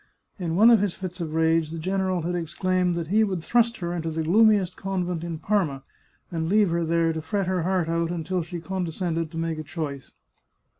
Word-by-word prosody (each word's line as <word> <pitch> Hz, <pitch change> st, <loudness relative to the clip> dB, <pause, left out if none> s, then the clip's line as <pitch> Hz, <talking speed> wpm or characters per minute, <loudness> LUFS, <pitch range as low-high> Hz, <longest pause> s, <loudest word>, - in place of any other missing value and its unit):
In 170 Hz, -3 st, -2 dB
one 220 Hz, +6 st, +7 dB
of 230 Hz, -, +6 dB
his 205 Hz, -4 st, -1 dB
fits 185 Hz, -1 st, -6 dB
of 160 Hz, -2 st, -4 dB
rage 160 Hz, -1 st, +2 dB
the 165 Hz, -, -6 dB
general 185 Hz, +1 st, -1 dB
had 175 Hz, +2 st, -2 dB
exclaimed 180 Hz, +1 st, 0 dB
that 170 Hz, -2 st, -4 dB
he 215 Hz, +3 st, +4 dB
would 190 Hz, -6 st, -2 dB
thrust 235 Hz, +2 st, +2 dB
her 175 Hz, -1 st, -3 dB
into 165 Hz, -2 st, -3 dB
the 160 Hz, 0 st, -2 dB
gloomiest 200 Hz, +1 st, +4 dB
convent 180 Hz, -3 st, -3 dB
in 170 Hz, -1 st, -4 dB
Parma, 155 Hz, -6 st, 0 dB, 0.5 s
and 165 Hz, -1 st, -2 dB
leave 205 Hz, -2 st, +4 dB
her 170 Hz, 0 st, +1 dB
there 165 Hz, 0 st, +1 dB
to 160 Hz, -, -4 dB
fret 195 Hz, +5 st, -1 dB
her 185 Hz, -1 st, 0 dB
heart 180 Hz, -1 st, 0 dB
out 165 Hz, 0 st, 0 dB
until 175 Hz, +1 st, -2 dB
she 170 Hz, +1 st, -6 dB
condescended 170 Hz, -2 st, -2 dB
to 165 Hz, -, -8 dB
make 165 Hz, -1 st, -2 dB
a -, -, -4 dB
choice. 145 Hz, -4 st, -6 dB
170 Hz, 210 wpm, -25 LUFS, 165-190 Hz, 0.5 s, one